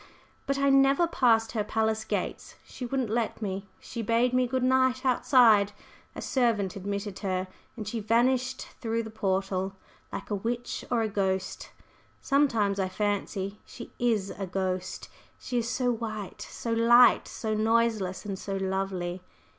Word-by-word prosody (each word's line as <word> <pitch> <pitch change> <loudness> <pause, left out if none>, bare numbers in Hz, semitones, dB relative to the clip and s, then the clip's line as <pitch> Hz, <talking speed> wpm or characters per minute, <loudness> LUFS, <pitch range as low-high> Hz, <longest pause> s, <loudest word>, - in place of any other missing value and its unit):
But 275 - 0
I 275 0 +3
never 275 +4 +5
passed 230 -8 +3
her 215 -3 -1
palace 220 +1 0
gates, - - -3
she 250 - -7
wouldn't 255 -3 -1
let 230 -1 -1
me. 195 -2 -4
She 235 - -6
bade 230 +3 +2
me 255 0 +3
'good 260 +1 -1
night' 260 0 +2
outside; 230 -5 +5 0.4
a - - -6
servant 225 -7 +1
admitted 200 0 -4
her, 185 -2 -2 0.3
and 215 -3 -6
she 225 +2 -3
vanished 250 +4 +1
through 230 0 -1
the 220 - -8
portal 195 -2 -1 0.4
like - - -6
a - - +2
witch 235 +4 -3
or 235 -2 +2
a - - 0
ghost. 190 -2 -2 0.5
Sometimes 230 -9 +2
I 190 -1 0
fancy 205 0 -2
she 240 - -11
is 220 -5 +1
a 195 - -5
ghost. 185 0 -3 0.3
She 245 -1 -2
is 235 0 -2
so 250 0 +1
white, 215 -4 -5
so 230 - -3
light, 240 +2 +6
so 220 -1 -3
noiseless 220 -3 +1
and 195 -2 -4
so 195 - -4
lovely!" 190 -2 -2
220 Hz, 155 wpm, -28 LUFS, 195-245 Hz, 0.5 s, light